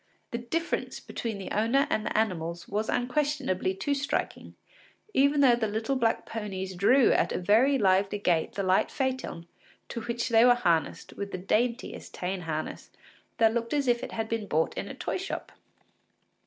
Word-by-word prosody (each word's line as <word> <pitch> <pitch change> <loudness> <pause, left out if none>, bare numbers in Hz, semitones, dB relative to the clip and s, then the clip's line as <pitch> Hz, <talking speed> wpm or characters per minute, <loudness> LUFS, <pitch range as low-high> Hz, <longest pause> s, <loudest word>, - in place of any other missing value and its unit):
The 235 - -2
difference 325 +8 -2
between 225 -3 -5
the 195 - -7
owner 230 +7 +2
and 215 - +1
the - - -2
animals 170 -6 -1
was 210 +2 -2
unquestionably 250 -7 0
too 240 +10 -1
striking, 280 +1 -3 0.6
even 280 +2 +4
though 260 -3 +7
the 230 -2 -1
little 220 +6 -1
black 230 -3 +1
ponies 190 -4 -5
drew 235 +8 +4
at 175 - +2
a - - -1
very 230 +9 +4
lively 195 -1 +2
gait 175 -5 +1
the 200 - -2
light 185 0 +3
phaeton 260 - -3 0.4
to 235 - -4
which 235 +1 -2
they 225 0 +6
were 245 0 +7
harnessed 170 -10 0
with 200 0 -6
the - - -3
daintiest 235 +6 -1
tan 185 +1 -3
harness, 155 -2 -5 0.5
that 225 -1 +4
looked 235 +3 -1
as 280 -2 0
if 240 -1 +2
it - - -6
had 225 -1 -2
been 225 -2 -3
bought 160 -1 +1
in - - -4
a - - -7
toy - - -3
shop. 380 +2 -5
225 Hz, 180 wpm, -28 LUFS, 190-250 Hz, 0.6 s, though